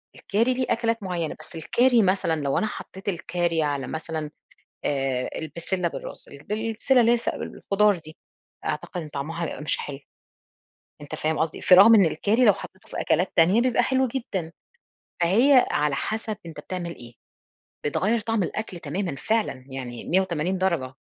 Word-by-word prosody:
الكاري 230 +5 +1
ليه 255 0 -1
أكلات 230 -1 0
مُعيّنة، 175 -4 -2
بس - - -11
الكاري 240 +9 +3
مثلًا 185 -5 +1
لو 140 -1 0
أنا 215 - +1
حطيت 195 -1 -6
الكاري 175 -2 -1
على 140 -3 -1
مثلًا 160 -1 -4 0.5
آآ، 135 -3 0
البسلة 170 +3 -2
بالراس، - - -7
البسلة 220 - 0
اللي 230 0 +4
هي - - +5
اس 235 - -6
الخضار 205 0 +1
دي، 155 -1 -13 0.5
أعتقد 180 - -3
إن 155 - -8
طعمها 150 +4 -4
هيبقى 150 - -6
مش 150 - 0
حلو، 140 -1 -6 1.0
أنت 145 - -7
فاهم 155 0 -1
قصدي؟ 160 -1 -1
في 180 - +6
رغم 205 +5 +9
إن 205 -3 +7
الكاري 210 +10 +2
لو 210 - +7
حطيته 190 - -12
في - - -5
أكلات 180 +4 +1
تانية 180 +7 +5
بيبقى 245 0 +2
حلو 260 +2 +2
جدًا، 200 -10 -4 0.7
فهي 245 +10 +5
على 150 -1 +1
حسب 220 +3 -3
أنت 165 -3 -8
بتعمل 170 +1 -5
إيه، 120 -1 -12 0.7
بتغيّر 200 +10 +1
طعم 225 -1 0
الأكل 190 0 -4
تمامًا 170 +2 -3
فعلًا 210 - -1
يعني 125 -3 -6
180 185 -1 0
درجة. 170 -9 0
180 Hz, 160 wpm, -25 LUFS, 155-220 Hz, 1.0 s, رغم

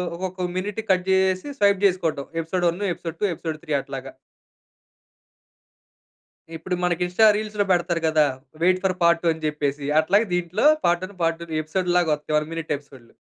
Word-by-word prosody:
ఒక్కొక్క 185 +1 -5 0.2
minute 205 +3 -3
cut 180 0 +2
జేసేసి 190 +3 +2
swipe 200 -1 +4
చేసుకోవటం. 165 -7 0 0.2
ఎపిసోడ్ 175 +2 -2
1, 175 +5 -4
ఎపిసోడ్ 165 -1 -7
2, - - +3
ఎపిసోడ్ 160 -2 -5
3 155 -3 -3
అట్లాగా. - - -7 2.4
ఇప్పుడు 165 +3 -3
మనకి 180 -1 0
ఇన్స్టా 180 +5 +3
రీల్స్‌లో 210 -1 -1
పెడతారు 175 -1 +1
గదా! 155 -1 +4 0.4
వెయిట్ 185 +1 +3
ఫర్ 190 -1 +1
పార్ట్ 170 0 +4
2 - - +1
అని 160 0 -6
జెప్పేసి 145 -2 -2 0.2
అట్లాగే 200 +8 +2
దీంట్లో 175 - 0 0.2
పార్ట్ 175 +1 +2
1, 195 +1 -13
పార్ట్ 165 0 +1
2 - - -6
ఎపిసోడ్ 180 +4 -2
లాగా 170 -3 +2
వస్తాయి. 150 +1 -4
1 150 0 -1
మినిట్ 165 -1 -5
ఎపిసోడ్‌లు. 135 -4 -17
175 Hz, 165 wpm, -23 LUFS, 160-185 Hz, 2.4 s, swipe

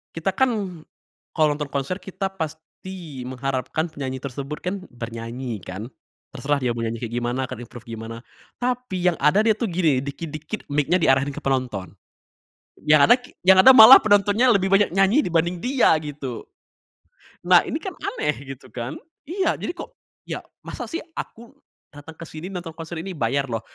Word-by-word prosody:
kita 165 +4 -1
kan 205 -10 0 0.5
kalo 155 - +4
nonton 150 -1 -5
konser 140 +6 -2
kita 190 0 -4
pasti 160 -2 -7
mengharapkan 135 +5 -2
penyanyi 130 -3 -4
tersebut 140 +2 -6
kan, 185 +2 -3
bernyanyi 115 -1 -6
kan. 95 +6 -7 0.5
Terserah 145 0 0
dia 125 -2 +1
mau 115 - -3
nyanyi 115 0 -3
kayak 115 -1 -5
gimana, 120 +2 -1
akan 130 - -7
improve 120 0 -13
gimana. 115 0 -7 0.4
Tapi 245 -7 -1
yang 165 - -7
ada 150 +7 +4
dia 220 - +5
tuh 235 - -1
gini, 160 -7 +2
dikit-dikit 155 +6 -6
mic-nya 150 +5 +2
diarahin 135 -1 +3
ke - - -5
penonton. 125 -9 -2 1.0
yang 150 -1 +7
ada 240 - +7
ki 245 - -16
yang 190 0 +8
ada 260 - +9
malah 230 +3 +11
penontonnya 205 +3 +3
lebih 195 -3 +2
banyak 200 +1 +4
nyanyi 195 +8 +4
dibanding 170 +1 0
dia 260 +1 +3
gitu. 140 -5 -7 1.0
Nah, - - +7
ini - - -3
kan - - -6
aneh 150 0 -1 0.2
gitu 125 - -18
kan, 120 +1 -5 0.3
iya 365 +1 +1
jadi - - -4
kok 335 - -8 0.3
ya, - - -5 0.2
masa - - -6
sih 335 - -3 0.2
aku 235 +1 -8 0.4
datang 145 +2 -12
ke 165 - -9
sini 160 +3 -8
nonton 175 -3 -6
konser 165 +1 -7
ini 190 +3 -6
bayar 140 +1 0
loh, 115 -3 -3
155 Hz, 170 wpm, -23 LUFS, 130-190 Hz, 1.0 s, malah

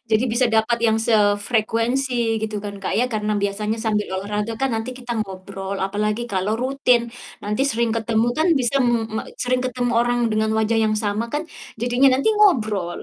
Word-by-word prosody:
Jadi 220 +3 +3
bisa 250 +1 +3
dapat 220 +2 +2
yang 220 0 +3
sefrekuensi 225 +4 +1 0.3
gitu 215 -1 -3
kan, 200 0 -5
Kak, - - -2
ya? 245 - +3
Karena 210 0 -1
biasanya 210 +2 -1
sambil 210 -1 0
olahraga 210 +2 -3
kan 270 - +2
nanti 225 +3 -4
kita 245 -1 -5
ngobrol 195 0 -6
apalagi 210 +3 -2
kalau 190 +3 0
rutin, 260 -2 +2 0.4
nanti 210 +5 -1
sering 230 0 0
ketemu 225 0 0
kan 320 - +2
bisa 245 +3 +3
me 240 - +2 0.2
me - - -1 0.2
sering 250 0 +1
ketemu 250 -1 -1
orang 245 0 +1
dengan 215 0 0
wajah 220 +1 +1
yang 215 0 +1
sama 205 +3 -1
kan, 295 +2 -1 0.4
jadinya 245 +3 +3
nanti 275 - +1
ngobrol. 215 - +2
220 Hz, 175 wpm, -21 LUFS, 210-245 Hz, 0.4 s, Jadi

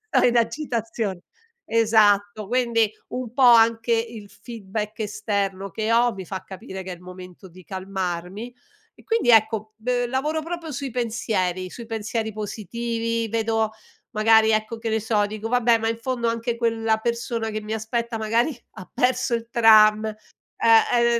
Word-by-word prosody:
sto - - +5
in 240 0 +2
agitazione 230 - -2 0.5
esatto, 215 -2 +3
quindi, 235 -3 +1 0.2
un 250 -3 -5
po' 270 0 +1
anche 230 -1 +5
il 225 -2 -3
feedback 215 -2 -6
esterno 200 -2 -2
che 220 +3 -1
ho, 240 +1 +4
mi 190 -2 -7
fa 190 +1 -6
capire 190 0 -8
che 185 - -7
è - - -5
il 175 - -19
momento 180 +1 -11
di 180 +1 -15
calmarmi; 190 +3 -5 0.4
e - - -19
quindi, 450 - 0
ecco 220 -1 +3
b 245 +2 -1
lavoro 300 +5 -1
proprio 335 -2 -5
sui 275 0 -4
pensieri, 210 -6 -2
sui 235 +3 -9
pensieri 220 -1 -3
positivi, 230 +2 -3
vedo 225 -1 0 0.4
magari 220 +1 +4
ecco, 215 +1 -1
che 225 -1 -3
ne 220 0 +1
so, 210 -2 +1
dico: 215 +1 -5
"Vabbè, 240 -2 +3
ma 225 - -1
in 230 - -2
fondo 240 -1 -2
anche 230 +1 -2
quella 225 -1 +1
persona 235 0 -2
che 215 - -3
mi 215 +1 -5
aspetta, 230 +1 -3
magari, 230 +6 +1 0.2
ha 185 - -11
perso 250 -1 +1
il 230 0 -5
tram", 215 -2 +6 0.5
eh, 235 +1 +4
225 Hz, 160 wpm, -23 LUFS, 210-235 Hz, 0.5 s, tram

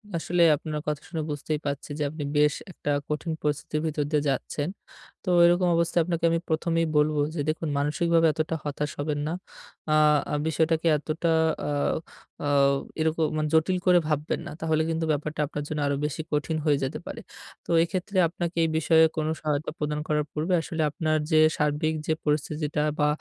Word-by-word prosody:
আসলে 175 +1 0
আপনার 150 +1 -4
কথা 150 0 -1
শুনে 160 -3 -3
বুঝতেই 150 +1 -2
পারছি 140 +1 -3
যে - - +1
আপনি 155 -1 -6
বেশ 150 0 +4 0.2
একটা 145 - -6 0.2
কঠিন 150 +2 -2
পরিস্থিতির 150 +1 -1
ভিতর 150 -1 -1
দিয়ে 150 -1 +2
যাচ্ছেন। 145 +4 -2 0.5
তো - - -21 0.2
এরকম 175 +1 +4
অবস্থায় 170 +1 +2
আপনাকে 170 -1 -1
আমি 165 0 +1
প্রথমেই 165 +1 +1
বলব 150 +1 +3 0.2
যে - - -3
দেখুন 160 0 -2
মানসিকভাবে 165 +3 +2
এতটা 160 +1 -1
হতাশ 145 0 -3
হবেন 145 0 -1
না। - - -2 0.6
আ - - +3 0.5
বিষয়টাকে 160 +1 +1
এতটা। 160 +3 -2 0.4
আ - - -1 0.8
আ - - 0 0.5
এরকম 160 0 +1
মানে 155 0 0
জটিল 170 +4 +3
করে 180 -1 +6
ভাববেন 150 0 -1
না। - - -6
তাহলে 160 -1 +1
কিন্তু 165 0 -1
ব্যাপারটা 150 +1 -2
আপনার 145 -1 -5
জন্য 155 -1 -3
আরো 140 - +1
বেশি 150 +1 -3
কঠিন 150 +2 0
হয়ে 145 -2 +4
যেতে 135 - -3
পারে। - - -7 0.4
তো - - -17
এক্ষেত্রে 185 +2 -3
আপনাকে 170 +1 -4
এই 160 - +2
বিষয়ে 160 0 +5
কোন 155 -1 -1
সহায়তা 150 0 -1
প্রদান 150 0 -2
করার 150 -1 +1
পূর্বে 160 +4 -1
আসলে 160 0 -3
আপনার 155 -1 0
যে 155 - +5 0.2
সার্বিক 150 +1 +1
যে 160 - +3
পরিস্থিতিটা 150 0 -1 0.2
বা 150 - +4
155 Hz, 175 wpm, -26 LUFS, 150-165 Hz, 0.8 s, করে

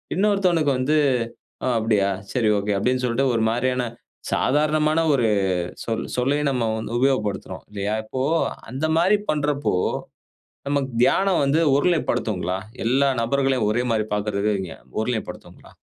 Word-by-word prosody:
இன்னொருத்தவனுக்கு 185 -6 +2
வந்து 145 +5 +1 0.7
அ - - 0
அப்டியா 105 -3 +2 0.2
சரி 115 -4 +1
ஒகே 100 +1 -1
அப்டின்னு 125 +5 0
சொல்ட்டு 125 +3 +1
ஒரு 115 - +1
மாரியான 125 +2 0 0.5
சாதாரணமான 155 +2 +2
ஒரு 125 -5 +2 0.6
சொ - - -5 0.3
சொல்லையும் 140 +3 +1
நம்ம 125 -4 0
வந்து 115 +1 -4
உபயோகப்படுத்துறோம். 130 -7 -1
இல்லையா? 100 +1 -2
இப்போ 130 +4 -4 0.5
அந்த 135 +6 -2
மாரி 185 +5 +4
பண்றப்போ, 145 -4 0 0.9
நமக்கு 140 -1 0
தியானம் 190 +7 +3
வந்து, 140 +4 +2
ஓரு 145 - +2
நிலைப் 170 -3 0
படுத்துங்ளா? 90 -4 -1 0.3
எல்லா 135 +3 +3
நபர்களையும் 135 -2 +1
ஒரே 120 +3 0
மாரி 110 -2 +1
பார்க்குறதுன்னு 105 0 0
வைங்க 95 -4 -4 0.3
ஓரு 110 - -1
நிலைப் 110 - -3
படுத்துங்ளா? - - -12
130 Hz, 140 wpm, -23 LUFS, 110-145 Hz, 0.9 s, மாரி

